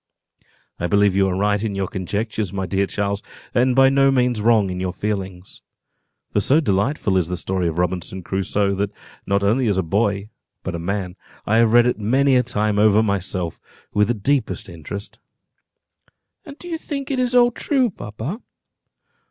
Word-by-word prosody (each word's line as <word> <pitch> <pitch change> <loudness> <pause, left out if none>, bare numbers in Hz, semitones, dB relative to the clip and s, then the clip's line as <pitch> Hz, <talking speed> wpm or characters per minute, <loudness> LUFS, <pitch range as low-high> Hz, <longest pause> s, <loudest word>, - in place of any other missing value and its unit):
"I 85 - -1
believe 100 +1 +3
you 95 0 +3
are 90 - -1
right 105 +1 +1
in 105 -3 -2
your 95 -1 -1
conjectures, 100 +2 -3
my 95 -1 -3
dear 95 +2 0
Charles, 100 0 -2 0.3
and 125 +1 +2
by 135 0 +6
no 135 0 +4
means 125 -4 +1
wrong 110 -4 +3
in 90 - -4
your 90 0 -2
feelings; 95 -2 -5 0.7
for - - +1
so 135 +9 +4
delightful 105 -4 +1
is 90 -3 +1
the 90 0 -3
story 90 +1 -1
of 80 0 -3
Robinson 90 +1 -2
Crusoe, 100 +2 0
that 100 +1 0 0.4
not 100 0 +1
only 115 +5 +2
as 100 -3 +1
a 95 - +1
boy, 100 +3 0 0.3
but 95 - -4
a 85 - -4
man, 95 +1 -3 0.3
have 115 +2 +4
I - - -2
read 120 0 +6
it 125 -2 0
many 130 +6 +3
a 125 - +5
time 105 -3 -1
over 105 +1 +5
myself, 95 -4 -2 0.3
with 105 -1 +3
the 120 - 0
deepest 125 0 -1
interest." 90 +5 -8 1.3
"And 285 -2 -10
you 340 -2 -4
think 280 -4 -5
it 265 - 0
is 250 0 +1
all 245 0 +6
true, 255 -1 0
papa?" 125 - -6
105 Hz, 180 wpm, -21 LUFS, 95-125 Hz, 1.3 s, by